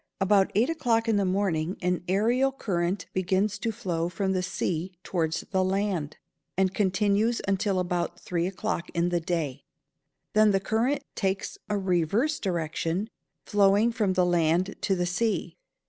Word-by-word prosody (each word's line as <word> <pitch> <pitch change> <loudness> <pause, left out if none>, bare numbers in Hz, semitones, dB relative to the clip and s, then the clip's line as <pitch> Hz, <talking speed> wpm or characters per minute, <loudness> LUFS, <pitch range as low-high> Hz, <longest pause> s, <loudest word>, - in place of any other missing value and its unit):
About 195 0 +3
eight 225 +5 +4
o'clock 235 -8 +1
in 220 -2 +3
the 200 - +2
morning 185 -2 0
an 180 0 0
ærial 245 +8 +2
current 180 -3 -1
begins 190 +3 0
to 225 +3 -1
flow 175 -7 -2
from 190 +2 -1
the 185 -1 +1
sea 180 0 -2
towards 160 -4 -1
the 190 -1 +2
land, 185 -5 -1 0.4
and 190 0 +2
continues 205 +3 +2
until 195 -1 +1
about 175 -1 -2
three 175 -1 -1
o'clock 180 -2 -3
in 170 +1 +2
the 175 -1 +1
day; 155 -5 -2 0.7
then 215 0 +5
the 195 -1 +3
current 240 +8 0
takes 195 -1 -2
a 210 - +1
reverse 195 - +1
direction, 170 +2 -2 0.3
flowing 205 +2 +4
from 215 -5 0
the 185 -1 +3
land 175 +2 +2
to 195 - +1
the 180 -1 0
sea. 210 +5 -1
190 Hz, 155 wpm, -27 LUFS, 175-210 Hz, 0.7 s, then